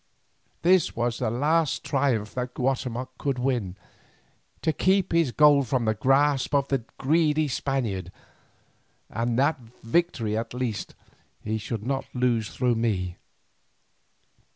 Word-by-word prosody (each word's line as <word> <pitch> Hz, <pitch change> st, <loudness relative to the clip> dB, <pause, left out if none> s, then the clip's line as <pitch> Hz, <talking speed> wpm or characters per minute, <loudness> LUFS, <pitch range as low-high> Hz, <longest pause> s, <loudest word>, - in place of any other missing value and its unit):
This 180 Hz, -1 st, +3 dB
was 120 Hz, 0 st, -1 dB
the -, -, 0 dB
last 150 Hz, +6 st, +1 dB
triumph 130 Hz, -7 st, 0 dB
that 125 Hz, 0 st, -4 dB
Guatemoc 130 Hz, -1 st, -2 dB
could 140 Hz, -3 st, -1 dB
win, 125 Hz, -8 st, -1 dB, 0.9 s
to 160 Hz, -, +2 dB
keep 190 Hz, +2 st, +2 dB
his 165 Hz, -6 st, +2 dB
gold 145 Hz, -1 st, +5 dB
from 125 Hz, -1 st, 0 dB
the 110 Hz, -, +2 dB
grasp 135 Hz, +5 st, +2 dB
of 140 Hz, -1 st, +1 dB
the 135 Hz, -, +1 dB, 0.2 s
greedy 155 Hz, +1 st, +2 dB
Spaniard, 115 Hz, -10 st, -2 dB, 1.0 s
and 115 Hz, +1 st, -1 dB
that 140 Hz, +2 st, +2 dB, 0.2 s
victory 115 Hz, -5 st, 0 dB
at 115 Hz, +2 st, -3 dB
least 125 Hz, -4 st, -3 dB, 0.5 s
he 110 Hz, +1 st, -2 dB
should 110 Hz, 0 st, -5 dB
not 135 Hz, +1 st, -1 dB
lose 120 Hz, -3 st, +1 dB
through 125 Hz, -1 st, +1 dB
me. 100 Hz, -6 st, -1 dB
125 Hz, 130 wpm, -26 LUFS, 115-145 Hz, 1.0 s, gold